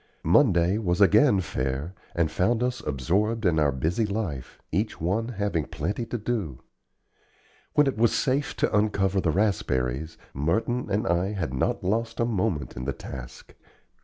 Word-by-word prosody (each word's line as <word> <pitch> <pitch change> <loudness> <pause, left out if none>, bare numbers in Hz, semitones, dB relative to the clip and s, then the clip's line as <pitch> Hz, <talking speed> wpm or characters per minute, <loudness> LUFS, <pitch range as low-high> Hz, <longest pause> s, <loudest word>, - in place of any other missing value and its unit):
Monday 90 - +4
was 90 -5 0
again 100 - +5
fair, 65 +1 -3 0.2
and 85 -2 +1
found 110 +8 +1
us 125 0 -1
absorbed 100 - 0
in 85 -3 +3
our 75 -2 +3
busy 80 - 0
life, 100 - -4
each 105 +6 -1
one 100 +8 0
having 100 - -1
plenty 100 +9 -3
to 120 - -3
do. 105 - -3 1.1
When 150 - +5
it 135 -5 -1
was 115 0 +4
safe 140 +1 0
to - - 0
uncover 100 -2 +2
the 85 - +1
raspberries, 80 - 0 0.2
Merton 110 - 0
and 100 +2 0
I 90 +4 +1
had 80 -10 -3
not 65 - -1
lost 115 +4 -1
a 115 - +3
moment 95 - -1
in 60 - -5
the 70 - -1
task. 60 -1 -9
95 Hz, 160 wpm, -26 LUFS, 80-110 Hz, 1.1 s, again